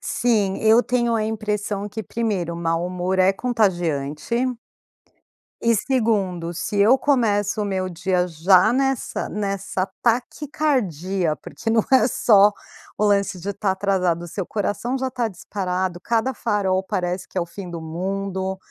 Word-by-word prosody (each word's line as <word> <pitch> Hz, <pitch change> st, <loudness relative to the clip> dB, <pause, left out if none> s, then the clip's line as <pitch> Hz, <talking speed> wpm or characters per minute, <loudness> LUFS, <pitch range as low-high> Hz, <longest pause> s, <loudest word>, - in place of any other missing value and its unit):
Sim, 215 Hz, -5 st, +1 dB
eu 220 Hz, +2 st, +5 dB
tenho 240 Hz, -2 st, +1 dB
a 220 Hz, -1 st, +1 dB
impressão 210 Hz, -2 st, -2 dB
que 220 Hz, +2 st, -5 dB
primeiro: 195 Hz, -6 st, -2 dB
o -, -, -6 dB
mau 165 Hz, +1 st, -1 dB
humor 180 Hz, +1 st, -2 dB
é 185 Hz, +1 st, +5 dB
contagiante. 175 Hz, -, -1 dB, 1.3 s
E 230 Hz, 0 st, +3 dB
segundo: 200 Hz, -8 st, 0 dB
se 205 Hz, -, -3 dB
eu 215 Hz, +6 st, +6 dB
começo 220 Hz, -8 st, +1 dB
o -, -, 0 dB
meu 190 Hz, -2 st, -1 dB
dia 180 Hz, +1 st, 0 dB
já 180 Hz, +6 st, +4 dB
nessa 270 Hz, 0 st, -1 dB
nessa 195 Hz, -2 st, -3 dB
taquicardia 225 Hz, -, 0 dB
porque 225 Hz, -, -7 dB
não 225 Hz, 0 st, +3 dB
é 260 Hz, -, +6 dB
só 210 Hz, -4 st, +5 dB, 0.4 s
o 210 Hz, -, +1 dB
lance 200 Hz, -3 st, +1 dB
de 195 Hz, -, -6 dB
estar 200 Hz, -1 st, 0 dB
atrasado, 190 Hz, -3 st, 0 dB
o 175 Hz, -, -7 dB
seu 185 Hz, +2 st, -4 dB
coração 220 Hz, +4 st, -2 dB
já 260 Hz, 0 st, -1 dB
está 245 Hz, -2 st, -1 dB
disparado; 185 Hz, -2 st, -3 dB
cada 230 Hz, +7 st, 0 dB
farol 200 Hz, -6 st, 0 dB
parece 180 Hz, -1 st, -2 dB
que -, -, -21 dB
é -, -, +3 dB
o 170 Hz, -, -2 dB
fim 180 Hz, +2 st, -8 dB
do 170 Hz, -1 st, -6 dB
mundo. 190 Hz, +3 st, -3 dB
195 Hz, 155 wpm, -22 LUFS, 180-225 Hz, 1.3 s, eu